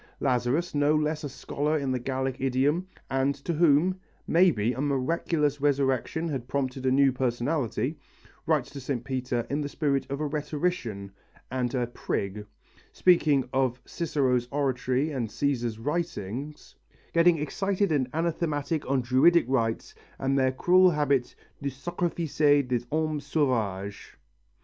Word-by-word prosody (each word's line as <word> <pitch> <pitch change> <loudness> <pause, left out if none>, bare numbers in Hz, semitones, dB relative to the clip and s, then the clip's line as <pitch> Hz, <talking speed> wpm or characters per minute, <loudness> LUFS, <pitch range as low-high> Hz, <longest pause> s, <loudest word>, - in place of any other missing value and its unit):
Lazarus, 130 +6 0
no 145 +1 +3
less 155 +1 0
a 145 - -3
scholar 150 +3 -2
in 140 -3 -1
the 130 - 0
Gallic 130 +1 -2
idiom, 135 +7 +1 0.2
and 135 +1 +1
to 145 +5 -4
whom, 170 +3 +3 0.3
maybe, 150 - +3
a 130 - -4
miraculous 145 +1 0
resurrection 140 +3 +1
had 130 -5 -4
prompted 130 -1 -2
a - - +3
new 135 0 +5
personality, 125 +2 -1 0.5
writes 155 -5 +1
to 140 - -8
St. 125 -2 -3
Peter 125 -2 -2
in 145 +2 -1
the 145 - -3
spirit 140 -3 -1
of 140 +1 -3
a 155 - -1
rhetorician 145 - -2 0.4
and 130 -1 -1
a 125 -1 +1
prig, 105 -3 -4 0.4
speaking 150 -7 +3
of 130 -1 +1
Cicero's 130 -7 0
oratory 135 +1 0
and 125 -5 -2
Cæsar's 120 -3 -1
writings, 145 - -4 0.4
getting 170 0 +5
excited 195 +5 -1
and 135 -4 +1
anathematic 160 -2 -1
on 135 -1 +2
Druidic 130 +7 +4
rites 115 -4 -1 0.2
and 135 0 0
their 130 -1 +3
cruel 180 +7 +5
habit 140 -6 0 0.3
de 140 - -1
sacrifier 150 -1 +1
des 125 -2 0
hommes 155 -1 -1
saulœvaiges. 105 -9 -1
140 Hz, 140 wpm, -27 LUFS, 130-155 Hz, 0.5 s, new